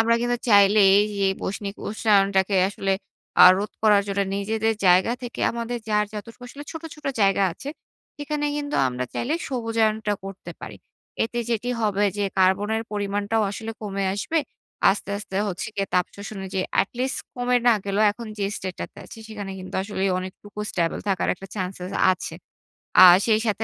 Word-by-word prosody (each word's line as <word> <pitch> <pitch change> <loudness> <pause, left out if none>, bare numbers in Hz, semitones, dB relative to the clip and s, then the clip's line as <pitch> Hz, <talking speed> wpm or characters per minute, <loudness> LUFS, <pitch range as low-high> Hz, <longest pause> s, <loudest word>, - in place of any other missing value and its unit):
আমরা 230 +1 +4
কিন্তু 240 0 0
চাইলেই 200 -1 +6
এইযে 205 -1 0 0.2
বৈষ্ণিক 200 +1 -4
উষ্ণায়নটাকে 200 -2 +2
আসলে 195 -1 -1 0.5
আ - - +12
রোধ 205 +2 -3
করার 210 -2 +5
জন্য 200 0 -1 0.2
নিজেদের 220 +2 0
জায়গা 185 +6 +5
থেকে 240 - -6
আমাদের 235 +1 -4
যার 210 0 +2
যতটুকু 215 +3 -9
আসলে 285 +3 -9
ছোট, 320 - -7
ছোট 300 -1 -18 0.2
জায়গা 195 0 +3
আছে, 275 - -9 0.5
সেখানে 295 0 -2
কিন্তু 290 0 -4
আমরা 125 0 -3
চাইলে 290 +7 -1
সবুজায়নটা 225 -4 0
করতে 195 0 -8
পারি। - - -8 0.5
এতে 240 +1 -4
যেটি 235 +2 -1
হবে 205 -1 +1
যে, 205 - +1
কার্বনের 205 +4 +2
পরিমাণটাও 205 +2 -1
আসলে 220 +2 -6
কমে 200 -2 -2
আসবে। 315 +11 -1 0.5
আস্তে, 200 0 -3
আস্তে 195 -2 -7
হচ্ছে 180 - -4
গিয়ে 195 -1 -1
তাপ 180 -1 +3
শোষণে 200 -1 -7
যে 190 - +1 0.2
এটি 195 - -3
লিস্ট 260 +1 -1 0.2
কমে 245 0 +1
না - - +7
গেলেও 200 +2 +1
এখন 235 +2 -9
যে 200 - 0
state 185 -1 -6
টাতে - - -7
আছি, - - -12
সেখানে 205 -3 -6
কিন্তু 185 0 -9
আসলেই 195 -1 -1
অনেকটুকু 190 +3 -9
stable 170 -2 -1
থাকার 190 -2 0
একটা 195 +2 -11
chances 185 -1 -4 0.2
আছে। - - -6 0.7
আ - - +12 0.2
সেই 220 -2 +3
সাথে 220 0 0
205 Hz, 170 wpm, -24 LUFS, 195-225 Hz, 0.7 s, আ